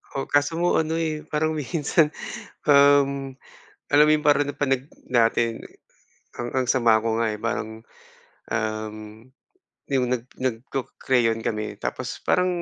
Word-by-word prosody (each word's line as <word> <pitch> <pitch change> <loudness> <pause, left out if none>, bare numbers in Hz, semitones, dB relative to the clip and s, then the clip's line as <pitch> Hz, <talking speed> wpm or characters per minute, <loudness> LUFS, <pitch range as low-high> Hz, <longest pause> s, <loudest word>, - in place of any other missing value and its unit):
Oo, 135 - -2
kaso 145 +3 +1
nga 175 -1 +2
ano 160 0 -2
eh, 155 -2 -2
parang 155 +1 0
minsan, 155 +1 +1 0.6
um, 140 -1 +4 0.6
alam 145 +1 +6
mo 150 - +4
yun, 155 - +1
parang 145 -1 +4
napanag 135 -2 -1 0.2
natin 115 -1 +2 0.7
ang 120 - -4
ang 130 -1 +1
sama 120 -3 +4
ko 110 0 -1
nga 115 -1 +1
eh, 105 - -5
parang, 110 0 -4 0.7
um, 110 -1 -2 1.0
yung 130 -2 +2
nag 125 -2 -1 0.2
nagco 130 +1 -3
crayon 115 -3 +1
kami, 105 -1 -3
tapos - - -5
parang 180 0 +2
130 Hz, 140 wpm, -24 LUFS, 115-145 Hz, 1.0 s, alam